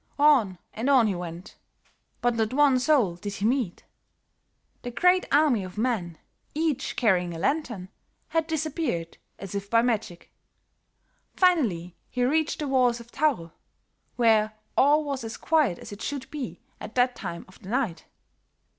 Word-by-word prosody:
On 270 -11 +4 0.2
and 235 +5 -2
on 260 -4 +6
he 210 - +1
went; 175 +1 -7 0.6
but 245 0 +2
not 225 0 -1
one 280 -3 +5
soul 250 - +2
did 200 +3 -5
he 200 - -3
meet. 235 -6 0 1.0
The 245 - -5
great 360 +9 +3
army 285 -8 +4
of 185 +1 -9
men, 210 -8 -1 0.4
each 310 -3 -1
carrying 180 -6 +1
a - - -5
lantern, 235 - -2 0.4
had 325 -1 0
disappeared 310 - -2 0.2
as 195 -1 -8
if 200 0 -4
by 230 +1 +4
magic. 215 -8 -2 1.0
Finally 225 - +2
he 250 - -1
reached 310 +4 +1
the 300 - -3
walls 250 -3 +2
of 235 0 -13
Thaur, 265 - 0 0.6
where 215 -2 +3 0.2
all 295 +3 +4
was 275 -4 -4
as 225 +1 -6
quiet 300 - +2
as - - -11
it 205 +2 -9
should 280 0 -5
be 285 -6 -6 0.2
at 215 - -9
that 250 0 +3
time 170 -4 -6
of 185 - -19
the 190 - -10
night. 235 -8 -1
240 Hz, 155 wpm, -26 LUFS, 195-285 Hz, 1.0 s, on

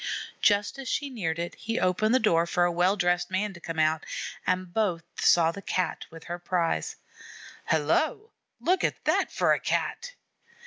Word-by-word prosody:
Just 205 +5 +2
as 265 -1 -5
she 285 -1 -1
neared 170 -10 -2
it, 170 +1 -3
he 225 +1 -3
opened 215 +6 +2
the - - +5
door 170 -7 +3
for 175 +1 +1
a 175 - +3
well 180 +3 +2
dressed 175 -2 +1
man 195 +2 -1
to 170 - -12
come 165 -1 -6
out, 155 0 +2 0.4
and 185 -1 -1
both 190 -7 0 0.2
saw 165 -1 +5
the 200 - -9
Cat 185 -1 -2
with 165 -1 -12
her 175 0 -5
prize. 170 - -1 0.7
"Hello! 300 - +1 0.3
Look 365 +2 +1
at - - -1
that - - +2
for - - +3
a - - 0
Cat!" - - -2
180 Hz, 180 wpm, -27 LUFS, 170-215 Hz, 0.7 s, the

